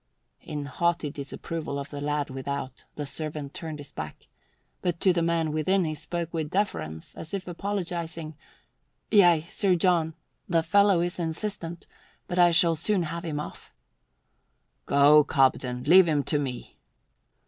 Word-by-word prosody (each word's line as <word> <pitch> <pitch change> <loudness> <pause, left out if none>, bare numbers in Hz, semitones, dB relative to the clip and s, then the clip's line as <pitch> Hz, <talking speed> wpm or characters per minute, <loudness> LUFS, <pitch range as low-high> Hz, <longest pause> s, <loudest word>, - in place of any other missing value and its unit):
In 145 -1 -5
haughty 165 +1 0
disapproval 145 +1 -5
of 140 0 -6
the 145 -1 -6
lad 145 -1 -1
without, 135 0 -5
the 145 - -4
servant 150 -1 -4
turned 160 -2 -6
his 145 -1 -10
back, 75 -1 -7 0.6
but 175 -2 -1
to 185 +1 +4
the 170 - +1
man 165 -2 +1
within 175 +5 +1
he 155 - -2
spoke 165 +2 -5
with 160 -2 -2
deference, 80 - -2
as 160 +5 -6
if 185 -2 -5
apologizing. 170 -4 -4 0.8
"Yea, 175 -6 +5
Sir 190 0 +2
John. 165 -3 +2 0.3
The 165 -2 +3
fellow 200 +1 +4
is 175 +1 -2
insistent, 170 0 -4 0.4
but 180 - -2
I 175 -1 +7
shall 170 0 +4
soon 180 +4 0
have 165 +1 -5
him 155 -3 -3
off." 150 - -8 1.2
"Go, 145 +2 +6
Cobden. 130 -3 +1
Leave 185 +3 +7
him 150 -3 +1
to 150 - +1
me." 130 -4 -5
160 Hz, 150 wpm, -27 LUFS, 145-175 Hz, 1.2 s, I